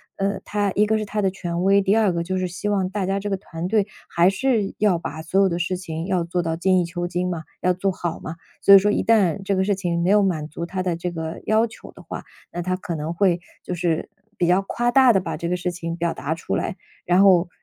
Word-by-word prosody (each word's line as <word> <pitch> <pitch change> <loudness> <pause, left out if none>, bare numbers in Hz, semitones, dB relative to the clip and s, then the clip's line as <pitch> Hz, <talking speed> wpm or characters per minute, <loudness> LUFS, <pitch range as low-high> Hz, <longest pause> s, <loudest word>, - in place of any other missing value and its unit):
嗯， 195 0 -1
他 205 -1 0
一 210 - +4
个 220 +1 +1
是 215 - -2
他 210 0 -2
的 195 - +2
权 175 -2 -4
威， 200 +1 +5
第 195 +2 +2
二 210 -5 +3
个 170 0 -1
就 185 +2 -2
是 185 - -1
希 190 +4 -4
望 195 -3 0
大 195 0 -2
家 195 +1 0
这 205 +1 -4
个 195 - 0
团 175 -3 -6
队， 210 0 +2 0.2
还 170 +2 +3
是 215 0 0
要 205 -4 +3
把 160 -1 -6
所 185 +5 +1
有 195 - +4
的 170 0 -2
事 180 +2 -1
情 165 -3 -5
要 185 -2 0
做 175 +1 -1
到 165 -1 -2
精 185 +2 +2
益 175 - +1
求 175 +1 -4
精 180 0 -1
嘛， 170 -3 -4 0.2
要 180 - +2
做 190 +2 0
好 175 -3 -4
嘛。 165 +1 -7 0.2
所 200 - +7
以 - - +12
说 205 +2 +1
一 - - +1
旦 200 -5 +3
这 195 +1 0
个 190 - +2
事 205 - +1
情， 175 -3 -1
没 175 - +1
有 210 0 +5
满 160 -6 -1
足 170 +2 -6
他 185 +1 -3
的 180 -2 -1
这 175 +1 -4
个 160 -1 -5
要 220 +2 +3
求 225 +1 -13
的 - - -15
话， - - -7 0.3
那 175 - -3
他 185 +1 -1
可 180 -2 -5
能 155 +2 -3
会 175 -1 +2 0.2
就 180 - -3
是 170 -2 -1 0.3
比 175 - +1
较 180 +2 +4
夸 240 +5 -1
大 260 0 +6
地 195 - +3
把 185 - -4
这 170 - -4
个 180 - 0
事 180 0 -2
情 170 -1 -5
表 170 0 -1
达 155 - -3
出 170 - -3
来。 - - -2 0.3
然 180 +2 +3
后 185 -3 +5
185 Hz, 295 characters per minute, -23 LUFS, 170-200 Hz, 0.3 s, 以